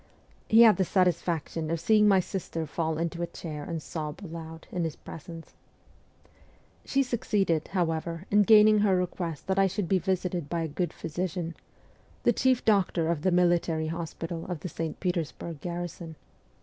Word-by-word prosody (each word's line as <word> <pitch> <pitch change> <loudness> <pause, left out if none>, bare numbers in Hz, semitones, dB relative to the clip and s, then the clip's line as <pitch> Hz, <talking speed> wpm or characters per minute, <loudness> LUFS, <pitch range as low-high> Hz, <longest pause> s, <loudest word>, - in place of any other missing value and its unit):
He 225 +2 +8
had 215 -5 +7
the 190 - +3
satisfaction 170 -3 0
of 165 0 -1
seeing 210 +3 +4
my 195 -2 +6
sister 170 -3 -4
fall 160 +1 -2
into 170 +1 -2
a 170 - -1
chair 155 -3 -7
and 165 +1 -4
sob 155 +2 -5
aloud 165 -2 -8
in 175 - -1
his 160 -2 -3
presence. 165 +1 -10 1.3
She 275 0 +1
succeeded, 205 - 0
however, 165 -1 -2
in 205 +1 +6
gaining 215 0 +7
her 205 -2 +3
request 175 -3 -3
that 190 +1 0
I 195 - +5
should 195 0 -2
be 190 +1 +2
visited 180 -3 -2
by 170 -1 -1
a 165 - -1
good 160 +2 -2
physician 170 0 -4 0.7
the - - +4
chief 260 -2 +2
doctor 185 -6 +2
of 160 -3 -2
the 185 - +2
military 175 -3 +2
hospital 165 0 -5
of 175 -4 -4
the 180 - -5
St. 160 0 -4
Petersburg 170 -3 -3
garrison. 175 -2 -5
170 Hz, 165 wpm, -28 LUFS, 165-190 Hz, 1.3 s, He